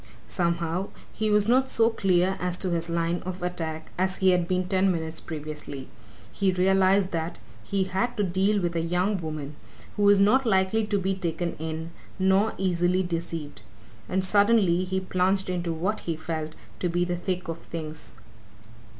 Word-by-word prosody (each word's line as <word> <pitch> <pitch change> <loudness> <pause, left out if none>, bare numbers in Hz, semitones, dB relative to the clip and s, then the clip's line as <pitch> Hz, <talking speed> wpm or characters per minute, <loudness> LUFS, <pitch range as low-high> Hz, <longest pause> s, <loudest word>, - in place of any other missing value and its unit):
Somehow, 170 +1 -1 0.3
he 215 0 0
was 210 0 +3
not 260 +2 +3
so 230 0 +3
clear 190 -3 +2
as 180 0 -2
to 185 -1 -2
his 170 0 -1
line 170 +1 0
of 185 0 -5
attack 160 -3 -4
as 190 +1 0
he 190 -1 +4
had 180 -1 +2
been 185 0 0
ten 190 0 +3
minutes 160 -2 -3
previously 150 -3 -7 0.4
he 195 -2 +1
realized 190 +1 +3
that 165 0 -3 0.3
he 195 - 0
had 190 +6 -1
to 210 - +2
deal 195 +3 +2
with 175 -2 -1
a 165 - +1
young 180 +5 0
woman 150 -2 -5 0.4
who - - -1
was 205 0 +6
not 225 +7 +5
likely 210 0 +2
to 210 -1 +1
be 195 0 0
taken 175 -2 -2
in 160 +1 -4 0.3
nor 190 +3 +3
easily 180 0 +1
deceived. 165 -3 -4 0.5
And 190 +1 +1
suddenly 200 -3 +4
he 190 +1 -1
plunged 185 +1 0
into 175 -2 -2
what 185 +7 -1
he 165 - -3
felt 160 -1 -4 0.2
to 180 - 0
be 175 +1 +1
the 175 0 -1
thick 180 +1 -3
of 165 0 -4
things. 160 -2 -7
180 Hz, 175 wpm, -26 LUFS, 170-195 Hz, 0.5 s, was